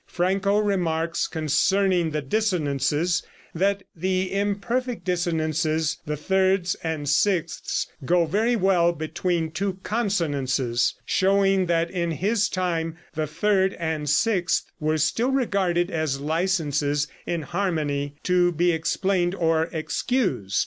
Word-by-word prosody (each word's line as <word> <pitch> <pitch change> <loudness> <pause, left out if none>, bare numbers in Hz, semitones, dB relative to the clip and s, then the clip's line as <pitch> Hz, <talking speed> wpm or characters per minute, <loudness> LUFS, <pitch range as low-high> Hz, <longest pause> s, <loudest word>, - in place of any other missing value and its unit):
Franco 195 +3 +1
remarks, 170 -5 0
concerning 175 +3 +1
the 150 -1 -3
dissonances, 160 - 0 0.3
that 195 +3 0
the 185 +2 -1
imperfect 210 +5 -1
dissonances, 160 -3 0
the 150 0 -2
thirds 190 +2 +1
and 160 -3 -3
sixths, 165 +3 0 0.2
go 175 +4 +3
very 220 +9 +1
well 180 -4 +3
between 160 +1 -2
two 190 +3 -2
consonances, 145 - 0
showing 195 -1 +2
that 170 0 +1
in 170 -2 -1
his 205 +6 +1
time 165 -3 -2 0.2
the 155 -1 -2
third 190 +4 +1
and 160 -3 -2
sixth 180 +3 +1
were 155 0 0
still 230 - +1
regarded 195 -9 +1
as 155 -4 -1
licenses 150 -3 0 0.2
in 170 -2 -2
harmony 150 -6 -2
to 180 -1 +3
be 175 +2 +2
explained 175 +2 0
or 165 -2 +1
excused. 160 - -1
175 Hz, 115 wpm, -24 LUFS, 155-195 Hz, 0.3 s, go